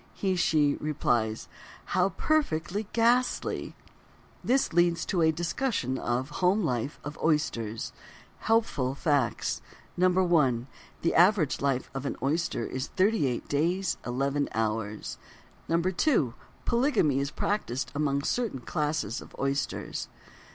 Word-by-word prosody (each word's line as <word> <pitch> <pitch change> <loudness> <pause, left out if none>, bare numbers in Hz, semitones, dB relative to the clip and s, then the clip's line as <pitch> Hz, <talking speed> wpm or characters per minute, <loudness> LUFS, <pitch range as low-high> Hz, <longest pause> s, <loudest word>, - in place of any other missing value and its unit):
She 190 -2 0
(he) 155 -5 +2
replies: 120 -7 0 0.4
"How 185 +1 +2
perfectly 205 - 0
ghastly." 240 +2 +1 0.7
This 260 -6 +2
leads 175 0 +3
to 180 -4 0
a 160 0 +5
discussion 165 - -1
of: 125 +4 -1
Home 190 +4 +3
Life 130 -1 -2
of 145 +1 -7
Oysters. 115 -9 0 0.5
Helpful 185 - +1
Facts: 145 -6 0 0.4
1. 175 -9 +3 0.4
The 165 - +2
average 180 -3 +4
life 135 -2 0
of 135 +1 -3
an - - -2
oyster 140 -4 0
is 130 +1 -3
38 185 - +1
days, 170 +5 0
11 140 +3 -1
hours. 110 -1 -2 0.5
2. 170 - +2 0.3
Polygamy 235 - +2
is 140 0 -1
practised 145 - -2
among 140 -1 0
certain 220 - -1
classes 145 -4 -2
of - - -13
oysters. 135 0 -2
155 Hz, 115 wpm, -28 LUFS, 130-185 Hz, 0.7 s, a